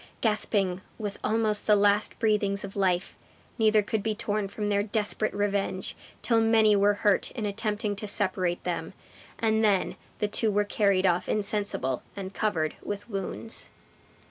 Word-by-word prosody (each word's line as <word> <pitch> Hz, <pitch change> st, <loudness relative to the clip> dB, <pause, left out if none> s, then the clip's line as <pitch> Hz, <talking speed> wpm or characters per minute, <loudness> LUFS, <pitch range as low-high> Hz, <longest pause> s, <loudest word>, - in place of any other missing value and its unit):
Gasping 205 Hz, -4 st, +2 dB, 0.2 s
with 205 Hz, -3 st, -5 dB
almost 215 Hz, -1 st, 0 dB
the 210 Hz, -, +6 dB
last 205 Hz, +1 st, +2 dB
breathings 210 Hz, -3 st, +1 dB
of 200 Hz, -1 st, -7 dB
life, 185 Hz, -2 st, 0 dB, 0.4 s
neither 215 Hz, -1 st, +4 dB
could 215 Hz, +1 st, -1 dB
be 215 Hz, +1 st, -1 dB
torn 210 Hz, -1 st, -2 dB
from 205 Hz, +1 st, -4 dB
their 200 Hz, -1 st, +2 dB
desperate 215 Hz, 0 st, 0 dB
revenge, 200 Hz, -2 st, -2 dB, 0.3 s
till 230 Hz, -1 st, +3 dB
many 220 Hz, -2 st, +5 dB
were 205 Hz, +1 st, +4 dB
hurt 205 Hz, -2 st, +3 dB
in 225 Hz, -4 st, -3 dB
attempting 210 Hz, 0 st, -2 dB
to 210 Hz, -, -5 dB
separate 185 Hz, -4 st, -1 dB
them; -, -, -3 dB, 0.4 s
and 220 Hz, -1 st, +1 dB
then 200 Hz, -3 st, +2 dB, 0.2 s
the 210 Hz, -, 0 dB
two 220 Hz, +2 st, 0 dB
were 205 Hz, 0 st, +1 dB
carried 200 Hz, -2 st, +2 dB
off 180 Hz, 0 st, +1 dB
insensible, 200 Hz, -, 0 dB
and 195 Hz, -1 st, -6 dB
covered 165 Hz, -9 st, 0 dB
with 205 Hz, +3 st, -6 dB
wounds. 200 Hz, +3 st, -5 dB
205 Hz, 155 wpm, -27 LUFS, 195-215 Hz, 0.4 s, the